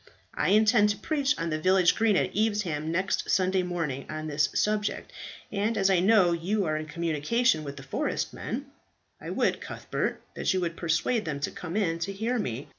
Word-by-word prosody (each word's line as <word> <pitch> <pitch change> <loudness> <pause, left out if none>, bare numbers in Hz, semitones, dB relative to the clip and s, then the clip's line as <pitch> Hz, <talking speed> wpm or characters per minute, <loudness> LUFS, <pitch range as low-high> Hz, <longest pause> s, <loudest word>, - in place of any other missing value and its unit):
I - - 0
intend 215 +1 +5
to 205 - -1
preach 295 +2 0
on 165 -1 -2
the 155 0 -2
village 185 0 +4
green 220 -2 +3
at - - -1
Evesham 195 -8 0
next 185 +3 -1
Sunday 185 0 +2
morning 165 -7 -3
on 155 0 -5
this 150 -1 +1
subject, 210 0 -1 0.4
and 210 +2 0
as 195 -1 +3
I 185 - +4
know 190 -2 +5
you 185 +5 0
are 155 -1 0
in 155 0 -4
communication 170 - +1
with 140 -1 -7
the 135 - -8
forest 135 - -2
men, - - -4 0.6
I - - -7
would, - - 0
Cuthbert, - - -3
that - - 0
you 185 - +1
would 170 -1 -2
persuade 170 +8 0
them 150 -3 -3
to - - -1
come 180 +2 -5
in 165 -6 0
to 170 +4 -2
hear 230 +5 -1
me. 125 - -4
180 Hz, 195 wpm, -27 LUFS, 155-210 Hz, 0.6 s, intend